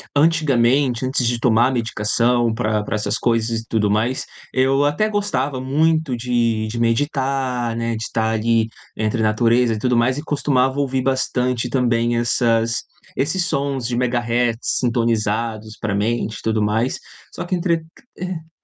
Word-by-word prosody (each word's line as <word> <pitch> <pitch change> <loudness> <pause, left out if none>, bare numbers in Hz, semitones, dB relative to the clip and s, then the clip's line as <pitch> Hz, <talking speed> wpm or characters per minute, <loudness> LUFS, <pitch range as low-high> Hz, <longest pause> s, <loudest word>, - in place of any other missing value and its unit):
antigamente, 135 -5 +2
antes 130 -1 0
de 120 0 0
tomar 120 +2 +3
medicação 115 0 +1
pra 110 -2 0
pra 105 - -3
essas 105 -1 -1
coisas 115 -1 0
e - - -16
tudo 105 -2 +1
mais, 110 +5 0 0.3
eu 135 +2 +3
até 150 +9 +1
gostava 145 -11 -1
muito 155 0 +1
de 115 -2 0
de 115 - -5
meditar, 130 0 0
né, 115 0 -1
de 110 0 -5
tá 110 -1 0
ali 115 0 +1 0.3
entre 110 +1 0
natureza 115 +2 +2
e - - -5
tudo 125 +2 +1
mais. 120 +3 +2
E 145 - -4
costumava 135 -3 +1
ouvir 135 -2 0
bastante 125 -2 0
também 120 -2 +1
essas 115 -1 +1 0.3
esses 155 +7 0
sons 140 -6 -1
de 120 - -2
Megahertz 120 -1 0
sintonizados 115 -2 -1
para 105 -2 -2
a - - 0
mente 110 +1 -1
e - - -12
tudo 110 -1 0
mais. 110 +4 0 0.3
Só 175 - -5
que 185 - -1
entre 175 -1 +1 0.5
e 160 -3 -7
120 Hz, 160 wpm, -20 LUFS, 115-135 Hz, 0.5 s, tomar